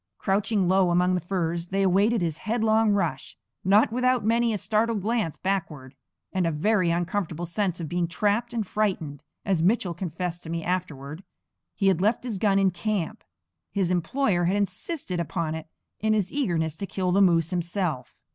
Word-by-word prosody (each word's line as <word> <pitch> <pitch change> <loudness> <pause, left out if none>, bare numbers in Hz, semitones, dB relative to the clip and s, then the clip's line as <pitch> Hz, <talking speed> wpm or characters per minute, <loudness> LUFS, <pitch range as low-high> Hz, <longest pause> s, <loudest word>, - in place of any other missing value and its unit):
Crouching 195 0 +1
low 190 0 +4
among 180 +1 +3
the 180 - 0
firs 170 -1 -2
they 195 +2 0
awaited 200 +3 +3
his 160 -2 -2
headlong 220 0 +2
rush; 170 -10 -1 0.3
not 205 +4 +4
without 250 -1 +1
many 230 +1 +2
a 215 - 0
startled 220 +1 0
glance 215 -7 -1
backward, 155 -9 -3 0.4
and 185 -3 +1
a - - +1
very 185 +4 +2
uncomfortable 175 0 -1
sense 180 0 -1
of 165 - -4
being 175 +2 -1
trapped 210 +6 0
and 230 -3 -2
frightened, 180 -9 -2 0.2
as 190 -5 +1
Mitchell 185 -1 +2
confessed 175 0 -4
to 160 - -9
me 165 0 -3
afterward. 165 -3 -4 0.5
He 200 - -1
had 185 -3 +3
left 215 +5 +2
his 225 -6 -4
gun 200 -1 +3
in 195 -1 +3
camp; 180 -1 -3 0.5
his 190 -3 0
employer 180 - +1
had 185 +3 +2
insisted 205 - -2
upon 170 -1 -2
it, 160 0 -6 0.3
in 215 0 +2
his 205 -3 0
eagerness 170 - -1
to 200 - -4
kill 185 -2 -1
the 195 +2 +4
moose 170 -3 +3
himself. 175 -6 -2
185 Hz, 175 wpm, -26 LUFS, 170-210 Hz, 0.5 s, low